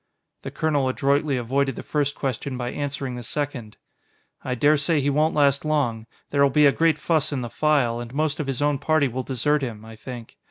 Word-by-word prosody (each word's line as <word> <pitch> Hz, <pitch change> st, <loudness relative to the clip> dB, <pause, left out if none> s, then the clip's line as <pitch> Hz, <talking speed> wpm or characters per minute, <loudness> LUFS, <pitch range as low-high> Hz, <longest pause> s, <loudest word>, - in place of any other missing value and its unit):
The -, -, -6 dB
colonel 145 Hz, -4 st, 0 dB
adroitly 140 Hz, +1 st, +1 dB
avoided 135 Hz, +2 st, 0 dB
the -, -, -7 dB
first 145 Hz, -1 st, -1 dB
question 130 Hz, 0 st, -3 dB
by 120 Hz, -1 st, -3 dB
answering 140 Hz, -2 st, -4 dB
the 125 Hz, -, -6 dB
second. 120 Hz, -3 st, -4 dB, 0.7 s
"I 125 Hz, -, -2 dB
dare 145 Hz, +5 st, +4 dB
say 150 Hz, +2 st, +1 dB
he 140 Hz, +1 st, +1 dB
won't 155 Hz, +3 st, +1 dB
last 140 Hz, -2 st, +3 dB
long. 125 Hz, -8 st, -1 dB, 0.2 s
There'll 140 Hz, -1 st, +4 dB
be 150 Hz, +3 st, +4 dB
a 140 Hz, -, +7 dB
great 160 Hz, +1 st, +2 dB
fuss 155 Hz, 0 st, +1 dB
in 135 Hz, -3 st, -2 dB
the 120 Hz, -2 st, -6 dB
File, 140 Hz, -7 st, +1 dB
and 120 Hz, -1 st, -7 dB
most 155 Hz, +2 st, -1 dB
of 150 Hz, -, -2 dB
his 135 Hz, +1 st, -1 dB
own 145 Hz, -2 st, +1 dB
party 155 Hz, 0 st, +2 dB
will 130 Hz, +1 st, -3 dB
desert 135 Hz, +4 st, 0 dB
him 110 Hz, -5 st, -5 dB
I 110 Hz, 0 st, -11 dB
think. 120 Hz, 0 st, -9 dB
140 Hz, 210 wpm, -24 LUFS, 125-150 Hz, 0.7 s, a